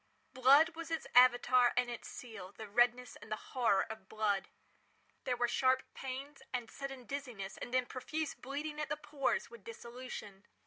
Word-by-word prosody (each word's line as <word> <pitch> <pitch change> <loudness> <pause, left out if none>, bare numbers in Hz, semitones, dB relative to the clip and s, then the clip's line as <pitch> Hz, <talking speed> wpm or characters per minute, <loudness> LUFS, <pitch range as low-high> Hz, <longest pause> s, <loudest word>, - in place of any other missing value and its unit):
Blood 275 +5 +7
was 330 0 -8
its 325 -1 -2
Avatar 245 0 +6
and 250 0 +3
its 240 -1 -6
seal—the 220 -3 -8
redness 240 +3 +2
and 215 - -14
the - - +2
horror 225 -3 +1
of 220 -4 -9
blood. 210 -2 0 0.8
There 250 -2 0
were 240 0 +2
sharp 260 +2 +3
pains, 270 +2 -6
and 245 -3 -3
sudden 270 -2 -6
dizziness, 245 -9 -5
and 245 - -6
then 255 0 +2
profuse 305 +5 -3
bleeding 295 +3 -5
at - - -3
the - - -1
pores, 280 -5 -1
with 235 -4 -12
dissolution. 230 -3 -8
250 Hz, 165 wpm, -35 LUFS, 230-275 Hz, 0.8 s, Blood